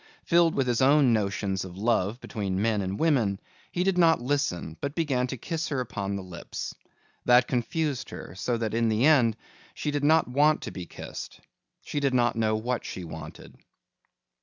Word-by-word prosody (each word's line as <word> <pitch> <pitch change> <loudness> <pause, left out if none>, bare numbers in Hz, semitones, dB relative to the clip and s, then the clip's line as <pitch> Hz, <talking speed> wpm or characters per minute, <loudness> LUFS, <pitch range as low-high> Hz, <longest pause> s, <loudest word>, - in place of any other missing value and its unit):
Filled 170 -1 +3
with 135 - +1
his 120 0 +1
own 135 -2 +5
notions 100 -2 -1
of 90 -1 -9
love 110 0 +1
between 100 -5 -3
men 110 0 +1
and 95 +1 -3
women, 120 -12 +2 0.3
he 180 - 0
did 190 -1 +1
not 165 -2 +5
listen 120 - -1
but 140 +1 -3
began 135 -7 0
to 130 - -5
kiss 165 +6 -3
her 140 -4 -2
upon 100 -5 -3
the 100 - -4
lips. 85 -2 -7 0.5
That 125 0 +5
confused 140 +3 -1
her - - -8
so 115 +6 -1
that 110 -2 -2
in 115 0 +2
the 110 +4 +2
end 125 -8 +4 0.4
she 150 - -2
did 145 -1 -2
not 160 +2 +4
want 145 +5 +3
to - - -5
be 90 -3 -7
kissed. - - -8 0.4
She 145 - -3
did 140 -2 +1
not 120 -1 +2
know 110 -1 +1
what 120 +3 -2
she 90 - -6
wanted. 80 -2 -9
120 Hz, 185 wpm, -27 LUFS, 100-145 Hz, 0.5 s, own